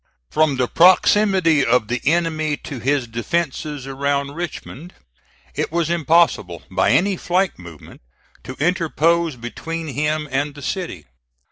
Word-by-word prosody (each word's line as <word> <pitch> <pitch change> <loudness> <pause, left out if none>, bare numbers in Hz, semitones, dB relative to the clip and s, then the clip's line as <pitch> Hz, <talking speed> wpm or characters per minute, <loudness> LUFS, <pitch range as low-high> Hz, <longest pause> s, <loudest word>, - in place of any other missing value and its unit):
From 155 -2 +2
the 125 -1 +1
proximity 185 - +4
of 120 -3 +2
the 120 +1 -2
enemy 155 -2 +1
to 135 - -8
his 135 +2 0
defences 145 +3 -3
around 140 +1 -1
Richmond, 170 -1 -7 0.6
it - - -2
was 170 0 0
impossible, 160 - +2
by 95 0 +2
any 195 +2 +3
flank 180 - -1
movement, 85 -4 -13 0.4
to 130 - -7
interpose 165 0 +1
between 160 +7 -6
him 150 +3 -1
and 145 +2 -1
the 145 - -10
city. 175 - -4
150 Hz, 130 wpm, -20 LUFS, 135-170 Hz, 0.6 s, proximity